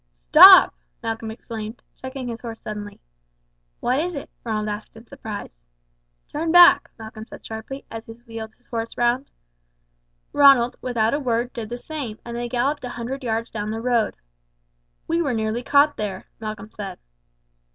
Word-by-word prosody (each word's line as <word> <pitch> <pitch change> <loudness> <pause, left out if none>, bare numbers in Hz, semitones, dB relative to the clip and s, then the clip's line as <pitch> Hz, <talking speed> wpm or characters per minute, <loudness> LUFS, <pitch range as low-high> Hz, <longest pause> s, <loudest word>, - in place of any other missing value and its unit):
"Stop!" - - +10 0.3
Malcolm 225 0 -3
exclaimed, 220 0 -7
checking 260 -1 -7
his 235 -1 -6
horse 230 -2 -7
suddenly. 210 -1 -7 0.8
"What 255 +3 +1
is 350 +2 -2
it?" 280 - -7
Ronald 215 -2 -2
asked 210 +1 -6
in 225 - -14
surprise. 205 - -8 0.7
"Turn 320 +2 -2
back!" 345 -5 +7
Malcolm 220 0 -9
said - - -12
sharply 225 +5 -7
as 225 0 -7
he 225 - -8
wheeled 225 -1 -9
his 245 - -37
horse 230 -1 -5
round. 245 +3 +1 1.0
Ronald, 275 -4 +6
without 230 -3 0
a 285 - +1
word, 245 -2 -1
did 230 -4 -6
the 240 - -4
same, 255 -5 -6
and 235 0 -6
they 240 0 -3
galloped 260 +4 0
a 250 - -4
hundred 245 +3 -5
yards 230 -1 -2
down 210 -1 -4
the 220 +1 -3
road. 235 -2 +1 0.9
"We 335 +1 +1
were 275 -7 0
nearly 220 +2 -1
caught 285 +3 +3
there," 195 -3 -4
Malcolm 215 -1 -6
said. 195 -3 -7
235 Hz, 160 wpm, -23 LUFS, 220-255 Hz, 1.0 s, Stop